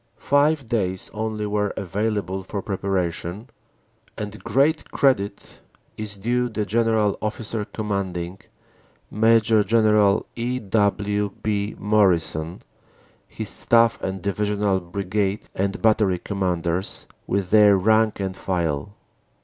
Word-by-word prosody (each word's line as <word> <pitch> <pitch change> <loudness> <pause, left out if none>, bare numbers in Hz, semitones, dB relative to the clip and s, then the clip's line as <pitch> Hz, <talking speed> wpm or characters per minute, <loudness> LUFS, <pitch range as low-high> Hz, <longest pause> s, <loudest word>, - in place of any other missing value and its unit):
Five 145 0 +2
days 95 -6 -1
only 110 -1 -3
were 105 -1 -1
available 100 0 -2
for 100 +1 -5
preparation, 95 +1 -3 0.7
and 105 0 -6
great 150 +4 +1
credit 100 -8 0 0.4
is 105 -2 -6
due 120 +5 0
the 110 -2 -2
G.O.C., 110 +3 -2 2.3
Major 110 0 +4
General 105 -1 +3
E. 120 +2 -2
W. 105 -1 0
B. 105 -1 -1
Morrison, 90 -5 +1 0.6
his - - -6
Staff 115 0 +3
and 95 -1 -4
Divisional 100 0 0
Brigade 100 +3 -2
and 100 +1 -2
Battery 105 -4 +3
Commanders, 90 -2 -2 0.2
with 95 -2 -1
their 105 -2 +7
rank 110 +2 +2
and 95 -1 -3
file. 85 -1 -2
105 Hz, 100 wpm, -23 LUFS, 95-110 Hz, 2.3 s, their